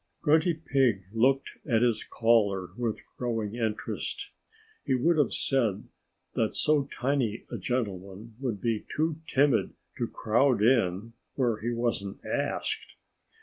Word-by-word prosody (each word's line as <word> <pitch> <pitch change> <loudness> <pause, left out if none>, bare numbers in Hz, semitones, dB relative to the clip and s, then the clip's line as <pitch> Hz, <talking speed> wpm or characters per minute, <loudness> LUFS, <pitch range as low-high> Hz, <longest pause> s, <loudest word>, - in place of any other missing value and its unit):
Grunty 160 +2 +4
Pig 135 - +1
looked 135 +4 +2 0.2
at 115 -1 +3
his 120 -3 +2
caller 105 -5 +2
with 120 -3 -2
growing 115 -4 -2
interest. 110 -3 -3 0.5
He 135 -3 +1
would 160 +7 +3
have 145 - +3
said 115 -7 0 0.4
that - - 0
so 150 -2 +2
tiny 125 -4 -1
a - - -4
gentleman 105 -2 -3
would 120 -7 -2
be 115 0 -1
too 155 0 +1
timid 140 -4 +2 0.2
to - - 0
crowd 115 0 +2
in 115 -2 +2 0.2
where 120 -5 +1
he 115 - -1
wasn't 115 -4 -2
asked. - - -2
120 Hz, 130 wpm, -28 LUFS, 110-135 Hz, 0.5 s, Grunty